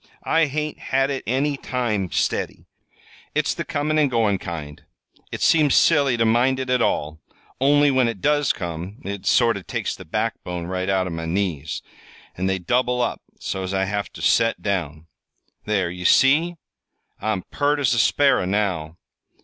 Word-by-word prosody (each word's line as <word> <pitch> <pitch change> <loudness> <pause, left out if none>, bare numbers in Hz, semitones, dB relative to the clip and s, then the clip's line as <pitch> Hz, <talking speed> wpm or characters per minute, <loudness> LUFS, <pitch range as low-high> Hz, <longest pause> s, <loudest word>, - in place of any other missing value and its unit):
"I 160 -1 +2
hain't 150 +2 -3
had 135 +1 0
it 135 - -3
any 140 +3 0
time, 115 -9 -2
steady. - - -2 0.7
It's - - +1
the - - -4
comin' 155 +2 -1
an' 150 - +4
goin' 110 -5 +1
kind. 75 -4 -7 0.5
It - - -5
seems 150 -4 +4
silly 140 -6 +4
ter 115 - +2
mind 125 +4 +2
it 130 -1 -3
at 125 - +2
all; 75 +1 -1 0.4
only, 145 +2 +4
when 130 -2 +3
it 115 -4 -4
does 145 +3 +2
come, 85 +4 -6
it 100 -1 -5
sort 115 -3 +4
o' - - -7
takes - - -3
the - - -11
backbone 90 -1 -3
right 95 +1 -3
out 95 -1 +1
o' 90 - -4
my 80 0 -4
knees, 80 -4 -2 0.5
and 95 +1 -1
they 95 - 0
double 125 +7 0
up 120 - -1 0.2
so's 95 0 -3
I 95 0 +1
have 100 +1 -3
ter - - -11
set 115 -1 +2
down. 80 -6 -2 0.6
There, 100 -5 0
ye 90 0 -7
see? 150 - +4 0.7
I'm 110 -4 -1
pert 145 +1 +1
as 135 -4 +2
a 120 - +1
sparrer, 140 -10 +3
now!" 90 -6 -1
110 Hz, 175 wpm, -22 LUFS, 90-135 Hz, 0.7 s, an